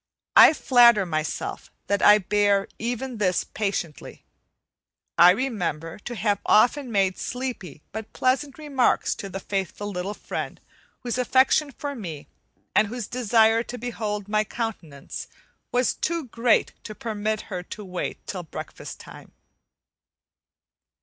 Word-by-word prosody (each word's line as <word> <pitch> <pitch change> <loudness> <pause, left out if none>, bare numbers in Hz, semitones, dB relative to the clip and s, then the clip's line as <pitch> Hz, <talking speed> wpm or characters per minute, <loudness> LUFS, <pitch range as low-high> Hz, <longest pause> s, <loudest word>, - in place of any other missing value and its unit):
I - - +9
flatter 235 -8 +5
myself 155 -3 -3 0.2
that 200 -1 0
I 210 - +8
bear 205 0 +2
even 245 +1 -3
this 185 -4 +1
patiently; 195 -7 -4 0.9
I 175 +1 +8
remember 180 - -1
to 240 +4 -7
have 205 -1 0
often 245 +4 +3
made 195 -3 +1
sleepy 235 - -5
but 220 +1 -7
pleasant 265 +2 0
remarks 285 -5 +1
to 195 - -7
the 195 - -5
faithful 195 +1 -3
little 190 +2 -4
friend - - -5 0.4
whose 245 0 -2
affection 260 +4 +3
for 285 +2 -5
me 165 - -7 0.5
and 210 - +5
whose 240 +1 -5
desire 225 -1 +3
to 245 +1 -7
behold 215 -4 -4
my 215 0 +2
countenance 205 - -6 0.4
was 250 0 +2
too 335 0 -2
great 235 0 +2
to 215 - -7
permit 215 -1 -2
her 180 - -2
to 205 +3 -9
wait 180 -1 -5
till 185 - -5
breakfast 165 - -8
time. - - -13
215 Hz, 130 wpm, -25 LUFS, 195-245 Hz, 0.9 s, I